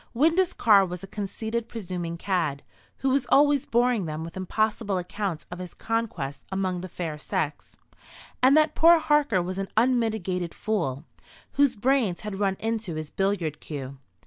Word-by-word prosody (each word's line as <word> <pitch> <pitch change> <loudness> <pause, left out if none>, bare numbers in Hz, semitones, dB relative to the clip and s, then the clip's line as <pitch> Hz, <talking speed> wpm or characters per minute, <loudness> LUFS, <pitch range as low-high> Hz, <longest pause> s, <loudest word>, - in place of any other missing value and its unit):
Windus 330 +7 +3
Carr 205 -4 +5
was 180 -1 -5
a - - -7
conceited 220 +3 -4
presuming 180 -6 -5
cad, 165 -7 -1 0.4
who 265 - +4
was 270 -1 +1
always 285 -1 +4
boring 240 -4 +2
them 155 +1 -4
with 165 - -8
impossible 205 +2 -1
accounts 180 -1 -3
of 175 - -6
his 180 -1 -8
conquests 220 - -3
among 190 -2 -1
the 185 - -7
fair 160 -3 -5
sex; 150 0 -3 0.6
and 265 +4 +6
that 310 -1 +4
poor 335 +1 +7
Harker 295 - +2
was 185 +2 -4
an 195 - -2
unmitigated 220 -8 +1
fool, 165 -10 -2 0.5
whose 280 -3 +3
brains 230 -5 +1
had 210 -2 -5
run 195 -2 +1
into 225 -6 -2
his 155 -1 -5
billiard 195 -6 -1
cue. 140 -3 -7
195 Hz, 160 wpm, -26 LUFS, 175-235 Hz, 0.6 s, poor